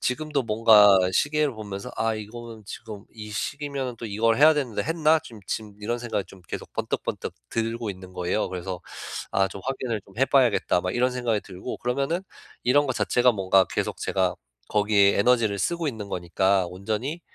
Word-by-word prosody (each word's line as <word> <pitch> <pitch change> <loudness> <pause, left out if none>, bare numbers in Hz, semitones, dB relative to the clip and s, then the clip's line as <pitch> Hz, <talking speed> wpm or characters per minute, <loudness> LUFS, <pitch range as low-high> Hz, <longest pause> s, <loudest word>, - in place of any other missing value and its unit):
지금도 150 +2 -1
뭔가 105 -3 +7
시계를 150 +4 +2
보면서 100 -2 -6
'아 115 0 +1
이거는 110 +1 -8
지금 105 -1 -8
이 105 -1 -9
시기면은 140 0 -3
또 115 - -6
이걸 110 +2 +2
해야 155 +2 +7
되는데 135 -7 -1
했나?' 160 -1 +3
좀 120 -6 -12
지금 105 -2 -4
이런 120 +3 -2
생각이 115 -5 -2
좀 95 0 -15
계속 - - -6
번뜩번뜩 - - -3 0.2
들고 115 -1 -2
있는 95 -1 -10
거예요. 90 +3 -1
그래서 90 -1 -5 0.5
'아 95 0 +3
좀 95 - -9
확인을 130 -4 -2
좀 100 - -19
해봐야겠다.' 130 -9 +3
막 90 0 -2
이런 125 +1 +2
생각이 120 -4 0
들고 95 +5 -7
그러면은 140 +8 -1 0.4
이런 145 +4 +4
거 130 - 0
자체가 125 0 +3
뭔가 95 -2 +4
계속 - - -2
제가 - - 0 0.3
거기에 105 -1 +4
에너지를 110 -2 +3
쓰고 170 +7 -1
있는 110 -6 -5
거니까 95 +1 +1
온전히 110 - -3
115 Hz, 375 characters per minute, -25 LUFS, 100-130 Hz, 0.5 s, 뭔가